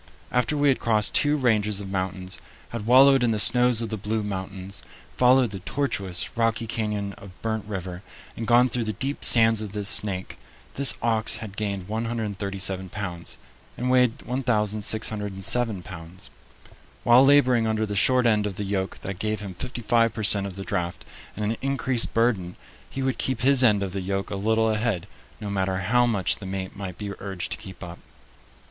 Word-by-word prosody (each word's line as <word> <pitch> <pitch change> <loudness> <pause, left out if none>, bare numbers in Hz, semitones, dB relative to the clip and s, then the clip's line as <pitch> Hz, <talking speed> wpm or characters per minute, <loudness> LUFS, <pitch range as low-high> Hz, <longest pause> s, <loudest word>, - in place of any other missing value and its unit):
After 125 +4 0
we 145 0 +3
had 135 - +1
crossed 110 -2 +2
two 150 0 +3
ranges 105 -6 +1
of 100 - -6
mountains, 95 -1 -4 0.3
had 115 -2 -6
wallowed 135 +2 +6
in 120 - +2
the 110 -2 0
snows 125 +1 +4
of 115 - -4
the 110 - -4
Blue 105 +2 -3
Mountains, 95 0 -5 0.3
followed 125 -2 +4
the 100 - -6
tortuous, 100 -4 -3
rocky 115 0 0
canyon 105 -3 -3
of 95 -2 -14
Burnt 110 -1 -2
River, 95 -3 -6 0.3
and 115 - -5
gone 120 +1 +5
through 120 -1 -2
the 110 - -2
deep 135 +7 -2
sands 115 -2 +8
of 105 -2 -7
the 105 -1 -4
Snake, 95 -2 0 0.3
this 140 -2 +5
ox 115 -1 +1
had 105 -4 -8
gained 100 -3 -4
137 100 -4 -2
pounds, 90 -4 -5 0.4
and 125 +1 -1
weighed 125 0 +2
1607 110 -3 -1
pounds. 80 +3 -10 0.7
While 120 +2 +6
laboring 130 -5 +4
under 110 0 0
the 105 -1 -5
short 125 +5 +3
end 105 -2 +2
of 100 - -6
the 105 - -4
yoke 95 -1 -3
that 95 -2 -6
gave 110 0 -2
him 100 -2 -7
fifty 120 +5 -6
five 115 +1 +2
per 110 - -4
cent 100 -1 +3
of 95 - -9
the 95 - -6
draft 85 -3 -4 0.3
and 105 - -3
an 110 +2 -2
increased 135 -3 +1
burden, 105 -7 0 0.3
he 135 - -4
would 130 -1 -2
keep 130 -2 -1
his 135 0 +5
end 105 -4 +4
of 95 -2 -5
the 100 - -3
yoke 95 +1 -3
a - - -2
little 110 +2 +1
ahead, 105 -5 -1 0.3
no 105 -2 -5
matter 95 -1 -1
how 120 +6 +2
much 100 -6 +1
the 100 - -9
mate 95 0 -5
might 95 -3 -7
be 100 -1 -5
urged 95 -3 -5
to - - -1
keep 95 -1 -10
up. 85 0 -9
105 Hz, 190 wpm, -24 LUFS, 95-120 Hz, 0.7 s, sands